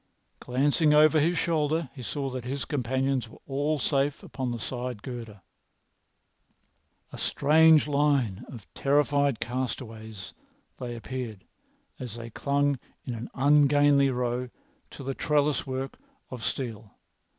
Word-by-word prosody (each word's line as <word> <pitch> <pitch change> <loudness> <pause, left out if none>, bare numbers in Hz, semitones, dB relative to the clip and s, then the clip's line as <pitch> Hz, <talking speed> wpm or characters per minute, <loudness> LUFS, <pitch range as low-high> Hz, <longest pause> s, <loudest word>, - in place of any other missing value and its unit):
Glancing 145 +4 +2
over 155 +1 +6
his 165 +3 +2
shoulder, 160 -2 0
he 130 - -9
saw 135 +2 -3
that 130 -1 -5
his 130 0 -3
companions 130 -2 -1
were - - -14
all 145 +3 0
safe 140 0 0
upon 130 -2 -4
the 120 -1 -3
side 125 -2 -5
girder. 115 -6 -7 1.7
A - - -8
strange 155 +1 +5
line 140 -9 +1
of 115 -7 -10
terrified 140 -2 +2
castaways 115 -5 -5 0.5
they 120 -1 -5
appeared 115 -5 -6 0.6
as 125 -4 -6
they 115 -1 -8
clung 140 +2 +1 0.3
in 125 - -3
an 115 +1 -6
ungainly 145 0 +5
row 125 0 -1 0.4
to 140 - -10
the 135 +1 -2
trellis 145 -1 +1
work 130 +1 -4 0.3
of 125 -3 -7
steel. 115 -5 -4
135 Hz, 130 wpm, -27 LUFS, 120-145 Hz, 1.7 s, over